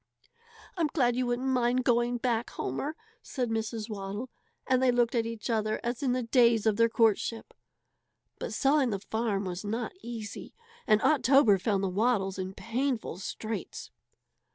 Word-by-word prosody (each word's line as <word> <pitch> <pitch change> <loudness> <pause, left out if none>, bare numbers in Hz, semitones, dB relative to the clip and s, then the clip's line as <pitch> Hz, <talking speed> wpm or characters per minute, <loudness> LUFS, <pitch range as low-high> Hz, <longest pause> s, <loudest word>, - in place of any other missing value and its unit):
"I'm 330 -3 +2
glad 245 -6 +1
you 250 0 0
wouldn't 245 +2 -1
mind 250 0 +2
going 240 -1 +2
back, 240 -1 -1
Homer," 275 - -4 0.3
said 250 -4 -3
Mrs. 220 -1 -2
Waddle, 205 +3 -5 0.3
and 255 -1 +2
they 260 - +4
looked 240 -1 +2
at 230 -2 +1
each 230 -2 -6
other 215 -2 0
as 240 +2 -3
in 260 -3 +1
the 250 0 -1
days 235 -2 +4
of 220 -2 +3
their 230 0 +4
courtship. 225 0 +1 0.9
But - - -4
selling 275 -2 +2
the 205 - -1
farm 210 -1 -2
was 180 +1 -4
not 225 +3 -3
easy, 230 -5 -7 0.3
and 215 -1 +4
October 270 -8 +5
found 200 0 0
the - - +1
Waddles 195 -1 0
in 190 +1 -4
painful 240 -4 -2
straits. 215 +1 -6
230 Hz, 160 wpm, -29 LUFS, 215-250 Hz, 0.9 s, October